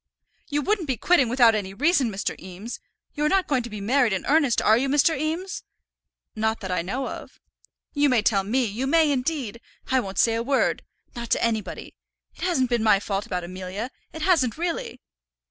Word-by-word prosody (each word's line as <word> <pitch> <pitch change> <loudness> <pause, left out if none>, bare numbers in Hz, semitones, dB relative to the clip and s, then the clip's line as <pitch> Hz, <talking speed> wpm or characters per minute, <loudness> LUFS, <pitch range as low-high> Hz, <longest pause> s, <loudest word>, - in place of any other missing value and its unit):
"You 295 -1 -1
wouldn't 395 -3 0
be 260 -3 -1
quitting 285 -6 +3
without 240 -2 +5
any 195 -3 -3
reason, 290 - +2
Mr. 200 -1 -3
Eames. 190 +6 -8 0.3
You 295 - -3
are - - +3
not 385 +1 +2
going 265 -4 +1
to 235 - -7
be 210 -1 -7
married 240 +2 +2
in 190 - -3
earnest, 285 -4 +3
are 215 - +4
you, 265 +4 0
Mr. 295 +3 +3
Eames?" 320 +7 -3 0.7
"Not 220 +1 0
that 190 -2 -4
I 180 - 0
know 250 +10 -3
of." - - -9 0.5
"You 290 -1 +3
may 240 -5 +2
tell 200 -3 +2
me; 245 +6 +1
you 230 +5 -3
may, 315 0 +4
indeed. 255 -4 -2 0.3
I 260 - +4
won't 195 -5 -5
say 230 - +4
a 230 - 0
word, 270 +3 +1 0.3
not 235 -1 -6
to - - +1
anybody. 220 -3 -2 0.4
It - - -17
hasn't 270 -9 +1
been 240 -2 +2
my 215 -3 +4
fault 200 0 -3
about 180 -1 -3
Amelia. 185 +6 -6 0.2
It 315 - -6
hasn't 315 - +2
really." 340 - -3
245 Hz, 200 wpm, -24 LUFS, 215-290 Hz, 0.7 s, without